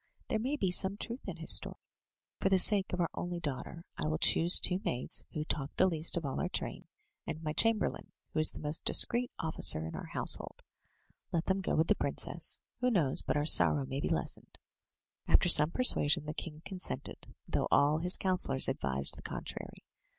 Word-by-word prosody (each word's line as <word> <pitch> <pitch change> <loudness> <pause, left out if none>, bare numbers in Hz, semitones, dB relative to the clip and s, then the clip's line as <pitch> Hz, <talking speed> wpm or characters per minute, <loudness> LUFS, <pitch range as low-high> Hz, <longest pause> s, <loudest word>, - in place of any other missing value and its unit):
There 220 - -2
may 260 +6 -3
be 190 -10 -3
some 190 +2 +3
truth 235 +4 -8
in - - -7
his - - +2
story. - - +8 0.6
For 195 - -1
the 190 - +2
sake 200 +1 +4
of 180 - -5
our 170 - -2
only 175 0 -6
daughter, 165 +2 -7
I 75 - -3
will 80 +1 -3
choose 170 - +4
two 180 +1 +1
maids 125 +1 -3
who 155 -3 -5
talk 145 -3 -6
the - - +2
least 165 -2 0
of 165 - -5
all 135 - -5
our 180 - -3
train, - - -7 0.4
and 160 0 -7
my 150 -1 -4
chamberlain, 225 +2 -1 0.2
who - - -2
is 155 - +3
the - - -13
most 150 +1 -2
discreet 245 +1 +3
officer 155 - +2
in 80 - -8
our - - -9
household. - - -3 0.7
Let 165 -1 -3
them 195 0 -2
go 185 - -3
with 160 - +1
the - - +3
princess; - - -3 0.2
who 250 0 0
knows 165 - 0
but - - -3
our 145 - -2
sorrow 145 -2 +2
may 135 +1 -6
be - - -4
lessened?" 75 - -4 0.7
After 175 - +2
some 150 -2 +7
persuasion 165 - +4
the 150 - -6
king 155 0 -10
consented, 190 -2 -7
though - - -3
all 145 +2 +1
his 180 +2 +3
councillors 180 -8 +2
advised 70 - +1
the - - -12
contrary. - - -9
165 Hz, 200 wpm, -30 LUFS, 150-190 Hz, 0.7 s, story